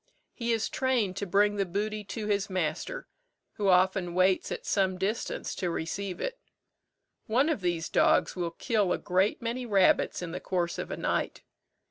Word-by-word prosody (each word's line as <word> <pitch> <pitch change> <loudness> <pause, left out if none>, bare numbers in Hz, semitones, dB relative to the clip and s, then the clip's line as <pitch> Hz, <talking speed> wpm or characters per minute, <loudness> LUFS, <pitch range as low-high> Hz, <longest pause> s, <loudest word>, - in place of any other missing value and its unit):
He 235 -1 -2
is 225 -1 +1
trained 245 -8 0
to 200 - -3
bring 205 +3 +3
the 200 - +2
booty 210 +3 -3
to 210 +2 -5
his 205 -1 0
master, 185 - -2 0.5
who 205 - 0
often 185 -1 +3
waits 185 0 +2
at - - -5
some 190 -2 +1
distance 200 +5 -2
to 180 - -2
receive 180 +3 -3
it. - - -3 0.9
One 255 +7 +3
of 300 -10 -1
these 175 -2 -1
dogs - - +3
will 175 -2 -1
kill 205 +2 0
a - - 0
great 190 +5 +1
many 240 +2 -2
rabbits 195 -3 +3
in 170 - -5
the 180 - -4
course 175 -2 -2
of - - -4
a - - -4
night. - - -1
195 Hz, 175 wpm, -29 LUFS, 180-215 Hz, 0.9 s, bring